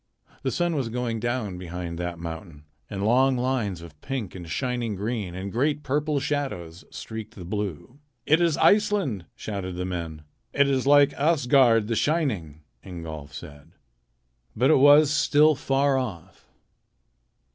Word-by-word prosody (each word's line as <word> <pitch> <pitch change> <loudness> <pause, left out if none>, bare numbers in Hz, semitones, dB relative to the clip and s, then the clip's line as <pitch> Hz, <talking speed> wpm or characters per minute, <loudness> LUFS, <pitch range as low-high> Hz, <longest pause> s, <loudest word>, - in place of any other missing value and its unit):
The - - -1
sun 175 -2 0
was 130 -5 -1
going 115 -1 -2
down 110 -6 -3
behind 85 -1 -6
that 85 -1 -4
mountain, 80 -2 -8 0.3
and 100 0 -3
long 130 +3 +3
lines 120 -9 -1
of 75 -3 -14
pink 130 -9 -4
and 90 -3 -9
of - - -9
shining 120 - -2
green, 100 -3 -3
and 95 +2 -5
great 145 +6 0
purple 145 +1 0
shadows 130 - -4
streaked 110 0 -8
the 90 - -9
blue. 100 - -5 0.3
"It 160 +3 +4
is 170 -3 +2
Iceland!" 200 - +2
shouted 95 -4 -5
the 90 0 -3
men. 85 -4 -5 0.3
"It 140 0 +3
is 135 -1 0
like 145 0 +6
Asgard 130 -7 +3
the 115 - -1
Shining," 110 - -1 0.2
Ingolf 80 -5 -8
said. 75 +2 -11 0.8
But 130 +7 +3
it 155 - +5
was 145 +1 +7
still 150 +1 +4
far 135 0 +1
off. 95 -8 -7
115 Hz, 150 wpm, -25 LUFS, 90-140 Hz, 0.8 s, was